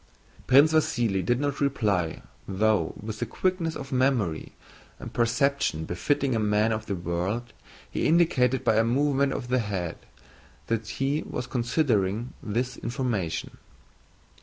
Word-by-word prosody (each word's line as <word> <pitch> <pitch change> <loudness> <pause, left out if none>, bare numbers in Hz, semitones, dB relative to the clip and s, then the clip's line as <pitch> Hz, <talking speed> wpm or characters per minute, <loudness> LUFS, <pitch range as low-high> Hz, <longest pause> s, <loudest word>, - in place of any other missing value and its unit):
Prince 140 +4 +6
Vasíli 120 -11 +1
did 120 +6 +1
not 145 0 -2
reply, 105 - 0 0.2
though, 105 +2 +1
with 110 0 -6
the - - -1
quickness 180 -3 -1
of 135 - -7
memory 125 - 0 0.4
and - - -9
perception 120 - +1
befitting 130 +9 0
a - - +1
man 105 +1 +2
of 110 0 -3
the 100 - -1
world, 90 +7 -3 0.3
he - - -1
indicated 135 -7 +3
by 110 - +3
a 110 - +5
movement 140 +3 +2
of 120 - -4
the 130 0 +2
head 95 -7 -3 0.7
that 115 -1 -2
he 135 +6 -1
was 125 - -5
considering 120 -4 0
this 125 +4 -2
information. 115 -9 -3
120 Hz, 135 wpm, -26 LUFS, 105-135 Hz, 0.7 s, Prince